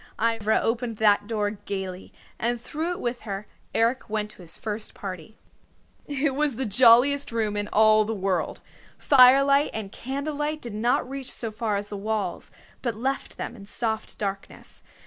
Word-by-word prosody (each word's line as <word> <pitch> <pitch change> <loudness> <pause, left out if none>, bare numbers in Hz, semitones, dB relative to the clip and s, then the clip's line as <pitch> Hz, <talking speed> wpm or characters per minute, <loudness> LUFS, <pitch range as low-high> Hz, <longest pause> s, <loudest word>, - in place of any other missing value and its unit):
Ivra 225 -1 +2
opened 230 -1 -1
that 205 -1 +3
door 210 -2 0
gayly, 190 -3 -6 0.3
and 240 +1 0
through 315 +8 -3
it - - -7
with 240 0 -3
her, 200 -1 -5 0.3
Eric 235 +2 +1
went 210 0 -2
to - - -15
his 165 -2 -7
first 215 0 -5
party. 185 +1 -7 0.7
It 285 -1 0
was 290 -2 +1
the 265 +3 -1
jolliest 245 +6 +5
room 220 -2 -1
in 205 0 -1
all 215 0 +5
the 220 +1 -3
world. 190 -2 -1 0.4
The - - -24
firelight 275 +2 +6
and 210 -3 -5
candlelight 295 +5 -3
did 240 -6 -7
not 235 +4 +1
reach 270 0 -5
so 225 -2 -4
far 215 -1 -1
as 205 +1 -3
the 205 - -5
walls, 205 -3 -3 0.3
but 235 -4 -2
left 265 +5 -3
them - - -5
in 200 -3 -11
soft 220 0 -2
darkness. 195 -1 -6
225 Hz, 170 wpm, -25 LUFS, 205-255 Hz, 0.7 s, firelight